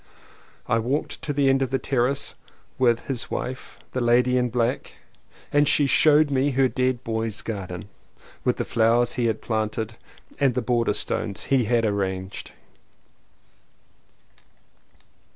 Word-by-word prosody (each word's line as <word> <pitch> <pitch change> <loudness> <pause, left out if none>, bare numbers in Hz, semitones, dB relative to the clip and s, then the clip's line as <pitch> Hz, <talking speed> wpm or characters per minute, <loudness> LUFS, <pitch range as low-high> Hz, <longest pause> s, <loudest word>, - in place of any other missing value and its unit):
I 115 -2 +2
walked 130 +7 -2
to 150 - -3
the 140 -1 +2
end 135 0 +3
of 130 - 0
the 135 - +1
terrace 135 +1 0 0.5
with 120 -3 +2
his 130 -4 -3
wife 130 0 -5
— - - -37
the 130 - -1
lady 120 +1 +3
in 125 -1 +2
black 120 +2 -1 0.3
— - - -28
and 145 0 +4
she 145 - +3
showed 150 +1 +4
me 135 +1 +2
her 135 -1 +3
dead 130 -1 -1
boy's 110 -2 -2
garden, 95 -3 -5 0.6
with - - +1
the - - -2
flowers 115 +1 +2
he 120 -2 0
had 110 -1 -2
planted 110 0 -2 0.4
and 135 -4 +2
the 125 - +1
border 120 -4 +1
stones 100 -2 -2
he 130 -4 +2
had 115 +1 +2
arranged. 95 -2 -3
120 Hz, 150 wpm, -24 LUFS, 110-135 Hz, 0.6 s, and